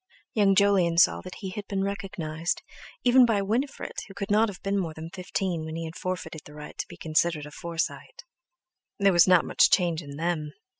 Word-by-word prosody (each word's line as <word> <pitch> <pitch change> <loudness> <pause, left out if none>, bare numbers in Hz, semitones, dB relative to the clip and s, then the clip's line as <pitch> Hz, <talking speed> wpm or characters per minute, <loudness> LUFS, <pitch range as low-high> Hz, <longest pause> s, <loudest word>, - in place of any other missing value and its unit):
Young 200 -3 +4
Jolyon 190 -4 +3
saw 175 - +5
that 185 - -9
he 190 -2 -4
had 205 +1 -6
been 195 -1 -1
recognised, 180 -5 -3 0.4
even 250 +1 +6
by 220 -4 +2
Winifred, 240 +8 -2
who 195 - -13
could 200 0 -4
not 215 +2 +4
have 190 - -8
been 200 0 0
more 165 -4 -3
than 160 +1 -8
fifteen 180 -2 -3
when 160 0 -6
he 165 0 -4
had 160 0 -8
forfeited 180 -4 -4
the 150 - -13
right 150 0 -9
to - - -2
be - - -12
considered 155 -1 0
a 150 - -10
Forsyte. 170 - -4 0.7
There 200 -1 +4
was 175 +1 +6
not 180 -3 +5
much - - +4
change 170 -3 +2
in 140 -2 -9
_them! 155 -2 -2
180 Hz, 205 wpm, -27 LUFS, 165-200 Hz, 0.7 s, even